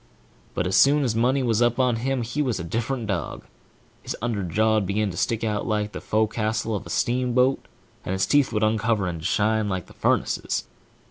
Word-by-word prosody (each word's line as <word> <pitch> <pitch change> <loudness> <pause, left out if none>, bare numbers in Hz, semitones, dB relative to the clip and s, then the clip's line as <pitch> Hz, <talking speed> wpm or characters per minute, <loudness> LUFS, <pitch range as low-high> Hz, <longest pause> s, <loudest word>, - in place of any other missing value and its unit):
But - - 0
as 95 - 0
soon 145 +1 +5
as 120 -4 0
money 130 +4 +2
was 115 -2 +1
up 120 -1 +2
on 125 -3 +2
him, 130 +1 -1
he 120 +6 -2
was 125 -8 -1
a - - -4
different 115 +7 -2
dog; 95 -7 -4 0.6
his - - -5
underjaw'd 110 -1 +1
begin 100 +1 0
to - - -9
stick 115 +5 -1
out 105 -1 -1
like 105 -1 -1
the - - -7
fo 110 +1 +1
castle 110 0 -2
of 100 - -5
a - - -10
steamboat, 125 +2 +1 0.4
and 95 - -3
his 95 0 +1
teeth 145 -2 +3
would 105 0 0
uncover, 110 -1 +1
and 85 -3 -4
shine 110 +4 +1
savage 105 -1 -1
like 95 -3 -3
the - - -16
furnaces. - - 0
110 Hz, 205 wpm, -24 LUFS, 105-120 Hz, 0.6 s, soon